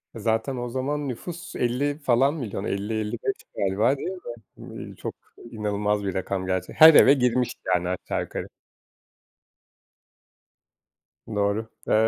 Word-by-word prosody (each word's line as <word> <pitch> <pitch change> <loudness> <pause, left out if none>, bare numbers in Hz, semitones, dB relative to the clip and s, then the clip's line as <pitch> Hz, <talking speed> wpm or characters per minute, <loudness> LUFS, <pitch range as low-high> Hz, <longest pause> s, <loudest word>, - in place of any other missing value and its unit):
Zaten 115 +4 -1
o 120 0 -3
zaman 140 +4 -2
nüfus 170 +8 -6
50 135 +4 0
falan 135 0 +3
milyon 115 -10 -4
50-55 110 - -2
galiba 105 +8 +2
değil 160 - -4
mi? 180 -10 -7 0.5
İii, - - -10
çok - - -6 0.4
inanılmaz 105 -1 -1
bir 95 - -2
rakam 95 0 -2
gerçek 95 -1 -2
Her 160 0 +12
eve 135 - +8
girmiş 125 -2 +1
yani 90 -1 +1
aşağı 90 - -2
yukarı. - - -5 2.8
Doğru, 105 +1 -1 0.2
eee, - - +2
115 Hz, 125 wpm, -25 LUFS, 100-135 Hz, 2.8 s, Her